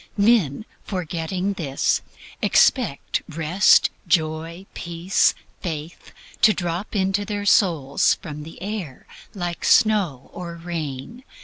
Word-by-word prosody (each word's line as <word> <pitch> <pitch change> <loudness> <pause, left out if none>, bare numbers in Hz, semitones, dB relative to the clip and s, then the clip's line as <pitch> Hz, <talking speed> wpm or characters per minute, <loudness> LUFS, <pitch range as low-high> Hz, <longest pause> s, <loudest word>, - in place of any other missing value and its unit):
Men, 205 - +3 0.2
forgetting 180 +1 -3
this, 145 -8 0 0.4
expect - - +2
Rest, 165 +5 +4 0.2
Joy, 165 +1 -1
Peace, 170 +2 +1 0.3
Faith 160 -1 -6 0.3
to 215 - +6
drop 175 +3 -4
into 195 +1 +1
their 205 -1 -4
souls 160 -10 +3
from 150 -3 -8
the 160 +2 -10
air 195 -10 -5 0.3
like 175 -3 -4
snow 195 - +3
or 175 -1 -6
rain. 165 - -6
175 Hz, 105 wpm, -23 LUFS, 160-200 Hz, 0.4 s, to